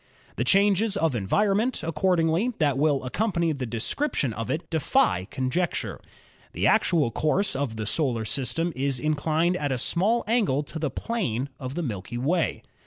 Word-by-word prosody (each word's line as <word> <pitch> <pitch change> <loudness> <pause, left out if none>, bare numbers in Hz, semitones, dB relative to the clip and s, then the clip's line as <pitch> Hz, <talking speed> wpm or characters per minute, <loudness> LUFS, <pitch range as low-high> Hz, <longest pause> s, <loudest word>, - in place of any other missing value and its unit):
The 120 - 0
changes 200 - +3
of 165 -7 +1
envifonment, 205 - +1
accordingly, 165 +6 +1
that 145 -4 +2
will 145 -2 +2
accompany 170 - 0
the 135 -4 -3
description 120 - -1
of 115 0 -5
it 155 - -2
defy 95 - +2
conjecture. 130 - -2 0.5
The - - -1
actual 155 -9 +3
course 185 - +1
of 135 -4 -2
the 110 -1 -4
solar 115 0 0
system 145 +8 -2
is 135 -1 -1
inclined 155 +4 +1
at 145 -4 -2
a 130 - 0
small 205 - +1
angle 205 - +1
to 160 +2 -7
the 155 -2 -1
plane 140 - -2
of 130 +1 -6
the 175 - -2
Milky 120 - -5
Way. 160 +7 0
155 Hz, 160 wpm, -26 LUFS, 130-180 Hz, 0.5 s, changes